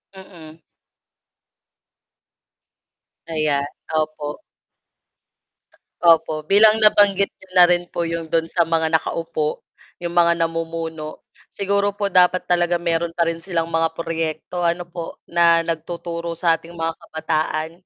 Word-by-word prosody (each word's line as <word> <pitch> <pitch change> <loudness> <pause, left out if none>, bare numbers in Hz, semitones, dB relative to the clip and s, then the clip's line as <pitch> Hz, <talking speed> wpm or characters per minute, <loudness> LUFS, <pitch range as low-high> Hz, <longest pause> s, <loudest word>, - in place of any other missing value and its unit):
Mm. 165 -4 -13 2.7
Ayan, 150 -3 0 0.2
opo. 155 -1 -3 1.6
Opo, 160 -2 +3
bilang 215 +4 +6
nabanggit 205 -2 +4
niyo 190 - -17
na 175 - +9
rin 175 0 +1
po 170 - -2
'yong 165 -1 -4
do'n 165 -1 +1
sa 170 +1 -1
mga 165 -1 0
nakaupo 160 -1 -2 0.3
'yong 170 -1 -5
mga 170 -1 +4
namumuno 165 -1 -5 0.2
siguro 200 0 0
po 205 - -1
dapat 180 0 +4
talaga 175 0 +1
meron 170 0 -1
pa 170 - +3
rin 165 0 -3
silang 165 -2 -2
mga 165 -1 -1
proyekto 165 +1 -3
ano 175 +1 0
po, 170 -1 -8
na 170 -1 +3
nagtuturo 170 0 -4
sa 170 -1 +3
ating 165 +1 -7
mga 165 0 -2
kabataan 160 0 -2
165 Hz, 120 wpm, -21 LUFS, 160-175 Hz, 2.7 s, na